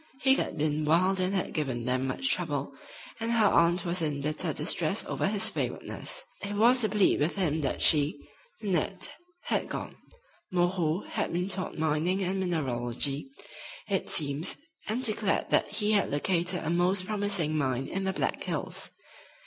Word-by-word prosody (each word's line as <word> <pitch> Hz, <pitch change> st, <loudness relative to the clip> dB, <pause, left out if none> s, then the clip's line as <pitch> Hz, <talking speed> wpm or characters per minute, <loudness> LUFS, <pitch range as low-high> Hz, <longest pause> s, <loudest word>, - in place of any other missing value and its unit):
He 265 Hz, 0 st, +5 dB
had -, -, -1 dB
been 150 Hz, 0 st, 0 dB
wild 185 Hz, +5 st, +3 dB
and 185 Hz, +2 st, 0 dB
had 190 Hz, -, -1 dB
given 130 Hz, -7 st, -2 dB
them 130 Hz, +1 st, 0 dB
much 265 Hz, -, 0 dB
trouble, 145 Hz, -5 st, -2 dB, 0.5 s
and 230 Hz, +1 st, -1 dB
her 225 Hz, -2 st, +4 dB
aunt 170 Hz, -1 st, +3 dB
was 175 Hz, 0 st, 0 dB
in 150 Hz, -3 st, -1 dB
bitter 150 Hz, +2 st, 0 dB
distress -, -, 0 dB
over -, -, -1 dB
his -, -, +2 dB
waywardness. -, -, -3 dB, 0.2 s
It 200 Hz, 0 st, -4 dB
was 240 Hz, +4 st, +5 dB
to 215 Hz, -, +2 dB
plead 205 Hz, -1 st, +3 dB
with 150 Hz, +4 st, 0 dB
him 160 Hz, -6 st, 0 dB
that 135 Hz, -, -1 dB
she, 145 Hz, -1 st, +5 dB, 0.5 s
Nanette, 190 Hz, -1 st, -1 dB, 0.3 s
had -, -, -1 dB
gone. -, -, -5 dB, 0.5 s
"Moreau" 175 Hz, -1 st, +1 dB
had -, -, -2 dB
been 180 Hz, +2 st, -1 dB
taught 185 Hz, -1 st, -3 dB
mining 160 Hz, +5 st, +1 dB
and 190 Hz, +1 st, -1 dB
mineralogy, 140 Hz, -, -1 dB, 0.6 s
it 195 Hz, -2 st, -1 dB
seems, 150 Hz, +3 st, +1 dB, 0.3 s
and 235 Hz, +4 st, -1 dB
declared 215 Hz, -4 st, +1 dB
that -, -, +4 dB
he 210 Hz, -1 st, 0 dB
had 205 Hz, -2 st, +3 dB
"located" 175 Hz, +4 st, 0 dB
a 160 Hz, -, -1 dB
most 180 Hz, +2 st, +2 dB
promising 200 Hz, -7 st, 0 dB
mine 135 Hz, -3 st, 0 dB
in 195 Hz, +6 st, -3 dB
the 190 Hz, -, 0 dB
Black -, -, -2 dB
Hills. -, -, -4 dB
175 Hz, 165 wpm, -29 LUFS, 150-195 Hz, 0.6 s, He